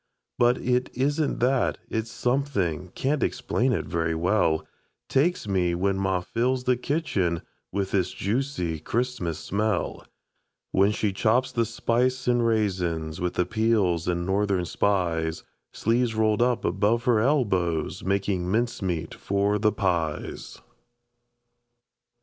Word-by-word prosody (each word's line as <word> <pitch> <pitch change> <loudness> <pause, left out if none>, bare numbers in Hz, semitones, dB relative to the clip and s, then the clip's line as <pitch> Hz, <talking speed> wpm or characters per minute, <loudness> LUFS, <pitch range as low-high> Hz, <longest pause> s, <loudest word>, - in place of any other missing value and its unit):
But 120 +1 +4
it 125 0 0
isn't 145 +2 0
that, 130 +1 +2
it's 110 0 -3
something 120 - -1
Can't 140 +2 0
explain 125 +2 0
it 120 - -1
very 80 -1 -1
well 85 -2 +1 0.4
Takes 160 -1 +1
me 90 -3 +1
when 95 +2 +1
ma 95 -2 0
fills 125 +6 -1
the 125 0 +3
kitchen 120 - -1 0.3
With 100 -1 -2
this 95 -3 +1
juicy 100 - -2
Christmas 105 -4 -2
smell. 105 +6 -1 0.7
When 100 +2 +4
she 105 -1 -1
chops 120 +6 +2
the 115 -2 +1
spice 125 +3 0
an' 120 -1 +3
raisins, 90 -9 0
With 90 -1 -1
the 90 - +2
peels 105 -5 +1
an' 85 0 -1
Northern 95 -1 +1
Spies, 85 -4 0 0.3
Sleeves 115 0 0
rolled 110 0 +2
up 120 -1 +1
above 110 +4 +1
her 120 -3 +3
elbows, 100 - +1
Makin' 95 -2 0
mincemeat 95 -7 -1
for 100 +1 0
the 105 +1 +3
pies. 85 -7 -2
105 Hz, 125 wpm, -26 LUFS, 90-120 Hz, 0.7 s, But